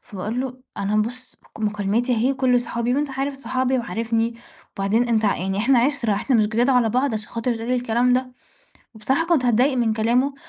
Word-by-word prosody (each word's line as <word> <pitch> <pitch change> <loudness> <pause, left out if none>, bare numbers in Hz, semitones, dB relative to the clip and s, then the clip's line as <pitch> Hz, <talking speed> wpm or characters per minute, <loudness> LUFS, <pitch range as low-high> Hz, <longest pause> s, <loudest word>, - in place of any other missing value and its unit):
فباقول 210 +5 -4
له: 255 -1 -5 0.2
"أنا 200 +2 -1
بُص، 245 +4 -3 0.2
مكالماتي 215 +3 0
أهي 240 +4 +1
وكُلّه 260 -2 +2
صحابي 235 0 -2
وأنت 290 +1 -1
عارف 270 +1 -3
صحابي 260 0 -1
وعارفني 230 0 -1 0.4
وبعدين 215 +5 +1
أنت 225 -2 +1
ع 205 - +2
يعني 190 +2 -2
إحنا 245 +4 +3
عِشرة، 240 -3 +1
إحنا 250 +5 +1
مش 215 -2 +3
جداد 235 +4 +1
على 250 -3 +3
بعض 255 +1 +1
عشان 215 0 -5
خاطر 230 0 -2
تقول 225 +1 -6
لي 255 - +2
الكلام 245 0 +1
ده." 255 0 0 0.6
بصراحة 265 +9 0
كنت 335 -7 +2
هاتضايق 250 +3 +3
من 235 -3 +1
كلامه 240 +5 +1
240 Hz, 195 wpm, -22 LUFS, 220-255 Hz, 0.6 s, إحنا